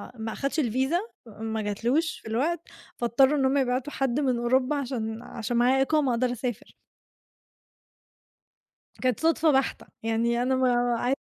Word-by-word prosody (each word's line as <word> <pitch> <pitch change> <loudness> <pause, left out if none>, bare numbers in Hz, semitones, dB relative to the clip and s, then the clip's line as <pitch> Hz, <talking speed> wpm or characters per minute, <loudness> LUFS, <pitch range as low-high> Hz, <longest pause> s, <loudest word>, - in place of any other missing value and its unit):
ما 220 -1 -5
أخدش 275 +3 -2
الvisa 265 - -1
ما 220 0 -2
جاتلوش 240 - 0
في - - -13
الوقت، 300 +10 0 0.4
فاضطروا 265 +4 +3
إن 270 - +2
هُم 270 +2 +2
يبعتوا 260 +1 0
حد 270 0 0
من 260 -4 +1
أوروبا 255 +4 +1
عشان 235 -5 -3
عشان 235 0 -4
معايا 255 +3 +4
إقامه 290 -1 +2
أقدر 245 +1 +1
أسافر. 245 -2 -5 2.3
كانت 255 -3 +1
صُدفة 325 -1 +3
بَحتة، 270 -1 0 0.2
يعني 235 +1 +1
أنا 260 +1 +1
ما 245 0 +2
255 Hz, 140 wpm, -26 LUFS, 235-275 Hz, 2.3 s, معايا